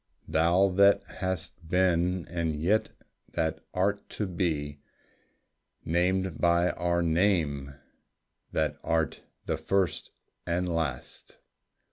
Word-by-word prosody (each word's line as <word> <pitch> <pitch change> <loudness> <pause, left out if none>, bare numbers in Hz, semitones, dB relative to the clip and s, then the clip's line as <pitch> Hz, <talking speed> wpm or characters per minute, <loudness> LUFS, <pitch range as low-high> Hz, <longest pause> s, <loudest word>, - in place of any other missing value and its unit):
Thou 85 +5 +3
that 100 0 +6 0.2
hast 90 -3 -4
been 90 -1 +2
and 85 -2 -2
yet 90 +9 +1 0.4
that 80 -1 -1
art 100 +2 -1
to 105 - 0
be 80 -6 -2 1.1
Named 90 +2 0
by 85 +1 +3
our 85 0 0
name, 80 -6 +1 0.8
that - - -1
art 80 0 0 0.2
the - - -1
First 95 -2 0 0.4
and 90 +2 0
Last! 80 -7 -4
85 Hz, 100 wpm, -28 LUFS, 80-95 Hz, 1.1 s, that